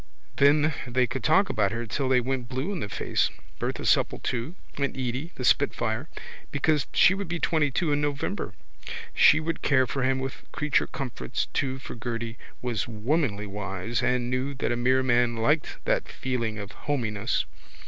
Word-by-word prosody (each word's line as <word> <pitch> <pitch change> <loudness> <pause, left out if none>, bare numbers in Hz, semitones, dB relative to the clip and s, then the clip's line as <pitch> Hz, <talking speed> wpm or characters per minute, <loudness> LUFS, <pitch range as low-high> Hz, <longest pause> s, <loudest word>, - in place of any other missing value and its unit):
Then 150 +2 +5
they 125 +1 +2
could 130 -1 -4
talk 195 +6 +5
about 100 -3 +1
her 115 +1 -3
till 130 +5 -1
they 130 -1 +4
went 125 -1 -2
blue 130 +8 -2
in 195 - -3
the 105 - -4
face, - - +1 0.3
Bertha - - -2
Supple - - +3
too, 125 +8 -3 0.2
and 140 -1 -1
Edy, 130 +2 -2
little 150 -7 -6
spitfire, 120 -1 +1 0.4
because 150 0 +1
she 185 - +6
would 195 -1 -3
be 170 +1 -2
twentytwo 155 0 +1
in 145 - +1
November. 145 - -2 0.6
She 155 - +7
would 165 0 -3
care 130 -2 +4
for 135 +2 -3
him 130 +1 +2
with 130 0 -6
creature 150 -2 +1
comforts 130 -1 -3
too 130 -2 0
for 135 - -8
Gerty 115 -1 -4 0.3
was 120 -4 -1
womanly 115 -1 0
wise 100 +2 -3
and 125 -1 +1
knew 130 +2 -1
that 130 - -1
a - - +1
mere 130 +2 +3
man 120 -2 +3
liked 140 +7 +1
that - - +1
feeling 115 -4 -2
of 100 -1 -6
hominess. 115 -6 -1
130 Hz, 175 wpm, -27 LUFS, 115-145 Hz, 0.6 s, She